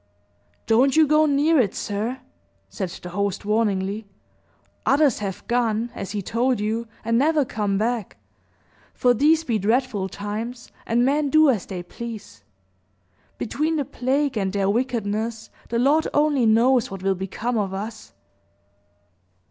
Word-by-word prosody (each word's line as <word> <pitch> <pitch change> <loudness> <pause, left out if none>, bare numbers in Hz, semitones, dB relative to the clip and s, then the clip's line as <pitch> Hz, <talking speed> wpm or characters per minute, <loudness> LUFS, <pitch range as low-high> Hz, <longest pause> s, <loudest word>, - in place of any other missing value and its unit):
"Don't 255 +6 +3
you 315 - +7
go 305 +1 +4
near 295 +2 +3
it, 210 -7 +1
sir!" 220 +6 -3 0.5
said 190 -4 -4
the 180 - -9
host, 200 +2 -2
warningly. 205 -1 0 0.8
"Others 275 -2 +3
have 195 -3 -5
gone, 235 -1 0
as 195 - -6
he 205 -1 -3
told 245 +4 0
you, 220 +2 -2 0.2
and 230 +1 +2
never 300 0 +3
come 205 -4 -1
back; 225 -1 -2 0.8
for 245 -1 +3
these 310 +7 +3
be 230 -8 0
dreadful 220 -2 0
times, 220 +5 -6 0.2
and 240 +2 +2
men 285 +2 +1
do 310 -1 +6
as 215 -7 -3
they 180 -3 -5
please. 200 - -9 0.9
Between 310 +7 -1
the 290 -3 -1
plague 270 +2 -1
and 190 -1 -1
their 200 -1 +1
wickedness, 225 -2 -2 0.2
the 235 - -1
Lord 285 +6 +3
only 290 -5 +3
knows 245 +3 +4
what 195 -1 -8
will 195 0 +2
become 210 +5 -3
of 195 -2 -1
us!" 210 +3 -7
230 Hz, 145 wpm, -23 LUFS, 205-265 Hz, 0.9 s, you